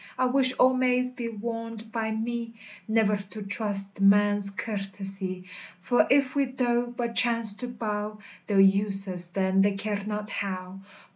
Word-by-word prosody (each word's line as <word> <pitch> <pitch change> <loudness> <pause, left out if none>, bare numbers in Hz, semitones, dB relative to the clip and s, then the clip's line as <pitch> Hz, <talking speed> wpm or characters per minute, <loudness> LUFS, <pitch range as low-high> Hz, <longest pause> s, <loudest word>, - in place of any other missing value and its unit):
I 255 - +2
wish 255 0 +3
all 255 0 +4
maids 255 0 +1
be 245 -2 -5
warned 230 0 -6
by 225 -1 -2
mee, 230 +1 -4 0.3
Nevir 220 -2 +2
to 215 -1 -7
trust 200 -1 +2
man's 205 0 +4
curtesy; 195 -2 -4 0.3
For 245 +7 +2
if 275 -1 +3
we 280 -1 +2
doe 245 -2 -1
but 240 -1 -4
chance 230 -3 +3
to 250 - -3
bow, 215 -3 -4 0.3
They'll 200 -2 +2
use 195 0 +3
us 180 -2 +2
then 190 +1 +1
they 200 +1 +3
care 205 0 -3
not 210 0 -5
how. 185 -1 -5
215 Hz, 155 wpm, -26 LUFS, 195-235 Hz, 0.3 s, all